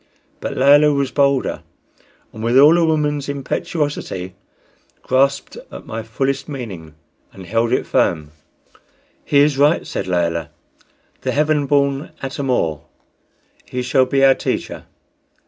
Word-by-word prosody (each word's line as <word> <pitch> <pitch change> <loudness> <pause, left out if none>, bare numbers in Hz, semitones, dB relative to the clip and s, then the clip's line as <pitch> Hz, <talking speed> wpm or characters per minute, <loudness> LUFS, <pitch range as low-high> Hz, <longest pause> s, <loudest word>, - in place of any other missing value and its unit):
But - - -5
Layelah 145 +3 +5
was 140 -2 -1
bolder, 140 -2 +1 0.7
and 110 - -8
with 120 +3 +2
all 150 +5 +7
a 170 - +3
woman's 150 -3 0
impetuosity 140 - -3 0.7
grasped 135 +2 0
at - - -10
my 110 +1 -5
fullest 135 +6 -3
meaning 95 - -8 0.4
and 95 - -12
held 115 +4 0
it - - +1
firm. 75 -1 0 0.9
"He 145 - +1
is 145 -2 +2
right," 145 +3 +3
said - - -4
Layelah 85 -2 -1 0.7
"the - - -2
heaven 150 -1 +1
born 140 +1 0
Atam 135 0 -4
or. 80 - 0 0.8
He 125 0 -4
shall 130 +1 +2
be 135 +1 +3
our 135 - +7
teacher. - - -4
135 Hz, 130 wpm, -19 LUFS, 115-145 Hz, 0.9 s, all